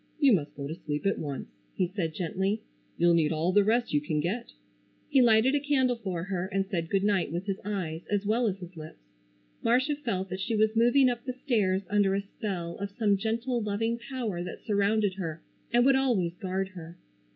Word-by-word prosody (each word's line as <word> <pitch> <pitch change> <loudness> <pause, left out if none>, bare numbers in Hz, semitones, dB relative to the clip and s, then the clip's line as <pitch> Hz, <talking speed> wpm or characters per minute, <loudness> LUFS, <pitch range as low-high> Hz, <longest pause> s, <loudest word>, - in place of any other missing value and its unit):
"You 280 -5 +6
must 150 -7 0
go 140 - -5
to 155 - -4
sleep 150 -1 -4
at 195 - +1
once," 145 -3 -4 0.3
he 185 - +2
said 170 -4 -3
gently. 190 +5 -1 0.3
"You'll 175 0 +4
need 160 -2 +3
all 160 +3 +1
the 205 +2 +5
rest 230 +1 +1
you 145 - +3
can 150 0 -1
get." 210 +10 -2 0.6
He 275 -3 +5
lighted 235 +2 +5
a 290 - +3
candle 270 -3 +2
for 185 -7 -3
her 185 -1 -2
and 195 0 0
said 170 -5 -3
good 195 -1 +1
night 200 -7 +1
with 175 +3 -3
his 195 -1 -2
eyes 180 -6 -3
as 205 0 0
well 230 +3 +2
as 195 -2 -1
his 180 -1 -10
lips. 155 -1 -9 0.6
Marcia 255 +5 +2
felt 195 -10 -3
that 185 +1 -4
she 225 +3 -1
was 215 +1 +2
moving 245 +4 +5
up 240 -1 -1
the 255 - -3
stairs 210 -8 +1
under 200 -1 +2
a 200 - 0
spell 185 -4 -5
of 200 0 -4
some 205 -1 +2
gentle 230 +4 -1
loving 225 +3 -1
power 235 -7 -4
that 180 - -8
surrounded 205 -1 +2
her 165 -3 -4 0.3
and 240 +1 +4
would 270 0 +6
always 230 -11 +1
guard 190 +1 -2
her. 170 -2 -10
200 Hz, 210 wpm, -28 LUFS, 175-230 Hz, 0.6 s, You